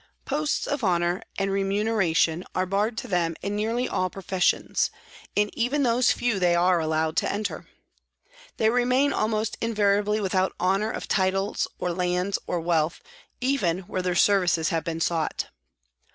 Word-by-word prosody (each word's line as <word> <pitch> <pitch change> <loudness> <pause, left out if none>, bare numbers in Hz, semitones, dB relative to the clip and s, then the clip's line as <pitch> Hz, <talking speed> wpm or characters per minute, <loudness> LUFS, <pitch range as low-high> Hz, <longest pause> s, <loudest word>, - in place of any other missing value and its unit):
Posts 295 +1 -1
of 285 -3 -2
honour 175 -1 +1 0.2
and 195 0 0
remuneration 195 -4 +1
are 185 - +1
barred 205 +4 0
to - - -4
them 170 -3 0
in 200 +1 -2
nearly 230 +4 0
all 185 - -1
professions, 190 -1 0 0.5
in 205 0 +2
even 270 +5 0
those 245 0 +3
few 240 -5 0
they 175 -1 +3
are 175 0 +3
allowed 160 0 0
to - - +1
enter. 205 +1 -4 0.9
They 220 0 +3
remain 250 +3 +2
almost 215 0 -1
invariably 210 -1 +1
without 190 -2 0
honour 195 +4 +1
of - - -5
titles 195 +1 0
or 180 - -2
lands 180 +2 0
or 175 - -1
wealth, 165 -1 0 0.4
even 205 -10 +1
where 185 0 -4
their 180 -1 -1
services 180 -4 +3
have 165 -2 -1
been 165 0 -4
sought. 165 -2 -1
195 Hz, 150 wpm, -25 LUFS, 175-215 Hz, 0.9 s, those